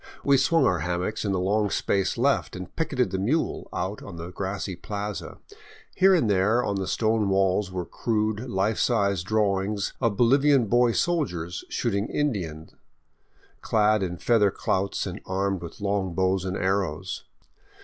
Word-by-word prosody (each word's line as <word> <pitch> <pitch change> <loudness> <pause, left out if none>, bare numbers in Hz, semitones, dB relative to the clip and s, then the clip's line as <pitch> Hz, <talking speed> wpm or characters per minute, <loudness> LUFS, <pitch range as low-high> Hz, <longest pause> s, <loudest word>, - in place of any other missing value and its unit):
We 140 - +4
swung 165 +5 +3
our 90 -2 +2
hammocks 90 +5 -2
in 100 - 0
the 95 - 0
long 105 +3 +1
space 95 +2 0
left 135 -2 +1
and 90 -1 -8
picketed 130 - 0
the 95 - -2
mule 135 +12 -1
out - - -3
on - - -9
the 85 +1 -7
grassy 95 0 -4
plaza. 105 +3 -5 0.6
Here 190 0 +5
and 160 -10 +2
there 105 +5 +2
on 100 - -1
the 95 -1 -3
stone 110 0 +1
walls 95 0 +1
were 90 -1 -3
crude, 110 +3 -2
life 100 +2 0
size 100 -6 +2
drawings 100 0 0
of 110 -4 +1
Bolivian 135 +1 +4
boy 120 +2 +3
soldiers 90 - -1
shooting 105 -3 -1
Indian^, 90 - -3 0.9
clad 110 -1 +2
in 90 -2 -3
feather 105 0 +3
clouts 95 0 -1
and - - -6
armed 95 0 -1
with 85 -1 -9
long 100 -3 -1
bows 95 0 +1
and 95 +1 -2
arrows. 95 -2 -2
100 Hz, 160 wpm, -26 LUFS, 95-115 Hz, 0.9 s, Here